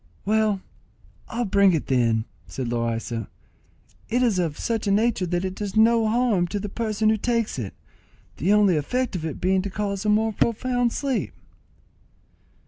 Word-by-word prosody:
"Well, 215 -1 +2 0.7
I'll 240 +1 -2
bring 200 -1 +4
it 160 - -1
then," 115 -4 +1 0.2
said 130 -3 -4
Loaysa. 115 -1 -2 0.8
"It 245 +3 +2
is 220 -7 +2
of 165 -4 -1
such 225 -2 -2
a - - +2
nature 210 -2 +2
that 175 +2 -1
it 185 - -3
does 200 0 -5
no 225 0 +5
harm 220 -6 +2
to 205 +4 -3
the 205 +1 -5
person 215 0 0
who 220 - +2
takes 230 - -1
it; 105 -5 -5 0.6
the 180 +7 +1
only 205 -5 +4
effect 250 - -1
of 165 -3 -3
it 155 - -6
being 190 +1 +2
to 200 - -4
cause 200 0 -3
a 215 - 0
most 215 0 +2
profound 245 +1 +1
sleep." 275 -1 -2
205 Hz, 170 wpm, -24 LUFS, 175-225 Hz, 0.8 s, no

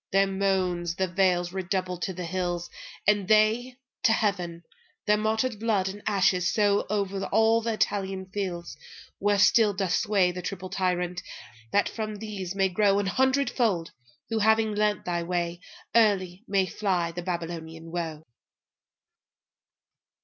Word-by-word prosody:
Their 195 +1 +4
moansThe 185 -2 -1
vales 180 -2 +2
redoubled 185 -1 -2
to 190 - -1
the 180 0 -5
hills, 175 0 -3 0.3
and 205 -2 +3
theyTo 220 +4 +3 0.3
heaven. 185 -7 0 0.4
Their 210 - +4
martyred 220 +2 0
blood 210 -4 +1
and 205 +2 -8
ashes 185 -4 +2
sowO'er 200 -1 0
all 225 +1 +4
the 230 0 -1
Italian 195 -3 -1
fields, 185 -3 -4 0.4
where 205 0 +2
still 210 +1 +4
doth 190 -2 -1
swayThe 185 -4 +1
triple 185 -1 -5
Tyrant; 180 -1 -1 0.5
that 205 - +3
from 215 -1 -4
these 200 -3 -5
may 195 -1 +3
growA 200 +1 +2
hundredfold, 250 -8 +1 0.4
who, 225 - +1
having 220 0 +3
learnt 210 -1 0
thy 175 -1 -1
way, 175 0 -2 0.3
Early 195 -4 +2
may 195 -1 +2
fly 180 -3 -1
the 175 +1 -5
Babylonian 165 -2 -5
woe. 165 -3 -4
195 Hz, 130 wpm, -27 LUFS, 175-210 Hz, 0.5 s, Their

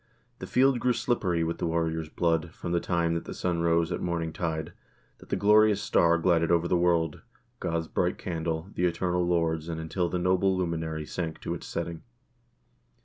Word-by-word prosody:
The - - -6
field 130 0 +3
grew 125 0 +2
slippery 95 -10 0
with 85 0 -3
warriors' 80 -1 -1
blood, 85 -1 0
from 85 - -5
the 85 - +2
time 85 -1 0
that 85 - -3
the - - -7
sun 85 -2 -1
rose 85 0 +2
at - - -2
morning 85 -2 -2
tide, 80 -1 -3 0.5
that - - -16
the - - +1
glorious 105 0 +5
star 85 -4 +3
glided 85 -1 +2
over 85 0 +3
the 90 - +2
world, 85 -3 +1 0.4
God's 80 -1 -2
bright 90 +2 0
candle, 80 +1 -3
the 90 - 0
eternal 90 +1 0
Lord's, 80 -2 0
and 80 -1 -3
until 85 +2 -1
the 90 - -1
noble 95 +1 +2
luminary 80 -3 -2
sank 80 0 -4
to - - -3
its - - -7
setting. 85 -1 -4
85 Hz, 185 wpm, -28 LUFS, 80-90 Hz, 0.5 s, glorious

